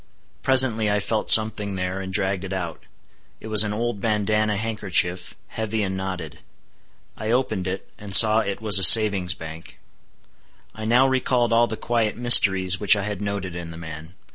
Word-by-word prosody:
Presently 125 -5 +1
I 105 0 -1
felt 110 +2 -4
something 105 -2 +4
there, 90 +1 -6
and 95 0 -9
dragged 95 0 -3
it 95 0 -8
out. 85 -4 -8 0.5
It 110 - -12
was 110 -1 +2
an 105 - -5
old 115 -1 -5
bandanna 105 -1 -2
handkerchief, 95 -5 -3
heavy 110 -1 -5
and 95 -1 -5
knotted. 90 -5 -8 0.8
I 110 - -8
opened 115 -6 -3
it, 95 +1 -7
and 100 -2 0
saw 110 0 +7
it 100 -1 -6
was 105 -3 +2
a - - -2
savings' 100 -4 +5
bank. 80 +1 -13 1.0
I 110 - -10
now 125 +4 +1
recalled 125 -2 -2
all 120 +1 +1
the 110 - -8
quiet 115 -3 -3
mysteries 95 -6 +5
which 105 0 +2
I 100 - -5
had 105 -1 -7
noted 100 -3 -6
in 85 -1 -9
the 80 - -12
man. 80 +1 -12
105 Hz, 175 wpm, -20 LUFS, 95-110 Hz, 1.0 s, saw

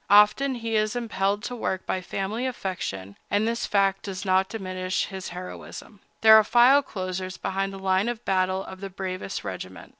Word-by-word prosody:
Often 210 +7 +5
he 230 -2 -3
is 215 +1 +1
impelled 205 -3 -1
to 245 +1 -4
work 190 -5 -2
by 185 - -1
family 205 +7 -3
affection, 100 - -5
but 205 +1 +2
this 235 +1 -1
fact 195 -1 +2
does 190 -1 -6
not 190 0 +3
diminish 185 -3 -2
his 190 -1 -6
heroism. 180 +3 -9 0.2
There 220 0 +9
are 220 - +6
file 245 +6 +6
closers 185 -5 -5
behind 195 +1 -2
the 195 - -8
line 190 +3 +1
of 240 -1 -5
battle 185 0 +1
of 190 0 -10
the 195 - -5
bravest 185 - -5
regiment. - - -7
195 Hz, 180 wpm, -26 LUFS, 185-220 Hz, 0.2 s, There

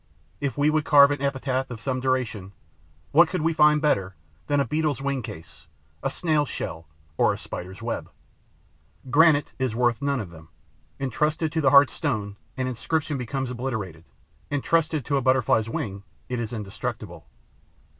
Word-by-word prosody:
If 140 -1 -3
we 145 +1 +3
would 155 0 +1
carve 145 -2 +7
an 145 -1 -2
epitaph 135 -1 -1
of 120 -2 -7
some 130 +2 -2
duration, 125 -7 -2 0.6
what 165 +2 +6
could 180 -4 -2
we 165 +1 +2
find 150 -1 +5
better 95 - 0 0.3
than 145 -1 +2
a 140 - +2
Beetle's 150 0 0
wing 140 -1 -1
case, 80 -7 -10 0.3
a 135 - 0
Snail's 150 -1 0
shell 80 -1 -5 0.3
or - - +4
a - - -3
Spider's 95 +5 -8
web? 115 - -3 1.0
Granite 150 0 +4
is 130 -4 -1
worth 120 0 +1
none 140 -1 0
of 100 -7 -6
them. 80 -1 -14 0.5
Entrusted 150 +4 0
to 160 0 0
the 135 - +4
hard 140 0 +7
stone, 105 -9 -2 0.2
an 130 - -1
inscription 145 +5 -2
becomes 130 +1 -3
obliterated; 110 -10 -4 0.4
entrusted 155 0 0
to 140 - +1
a - - +1
Butterfly's 125 -4 +2
wing, 100 -3 -4 0.3
it 125 - -2
is 115 -2 -4
indestructible. 105 -4 -6
130 Hz, 165 wpm, -25 LUFS, 110-145 Hz, 1.0 s, carve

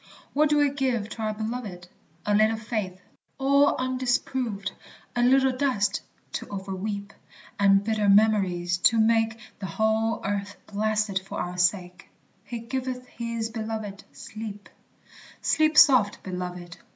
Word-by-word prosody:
What 300 +1 +3
do 295 - +3
we 290 -1 +3
give 255 -6 -1
to 225 - -7
our 215 0 -1
beloved? 215 -5 -5 0.4
A 210 - +1
little 215 +2 +4
faith, 215 -4 -4 0.4
all 280 +1 +4
undisproved, 255 -4 -1 0.4
A 240 - +1
little 265 +2 +4
dust 255 -7 0 0.3
to - - -5
overweep, 200 +1 -4 0.5
And 195 0 +5
bitter 215 -1 +1
memories, 190 -4 +3
to 225 +5 +4
make 225 0 +3 0.2
The 195 - -4
whole 220 +4 0
earth 200 0 -3
blasted 210 -1 0
for 190 - -7
our 180 0 -4
sake, 180 0 0 0.3
"He 240 - -6
giveth 255 +1 -4
his 230 -1 -4
belovèd 220 -3 -5
sleep." 215 -2 -8 0.7
"Sleep 310 0 +2
soft, 250 -11 +6
beloved!" 180 -2 -6
215 Hz, 130 wpm, -26 LUFS, 200-245 Hz, 0.7 s, soft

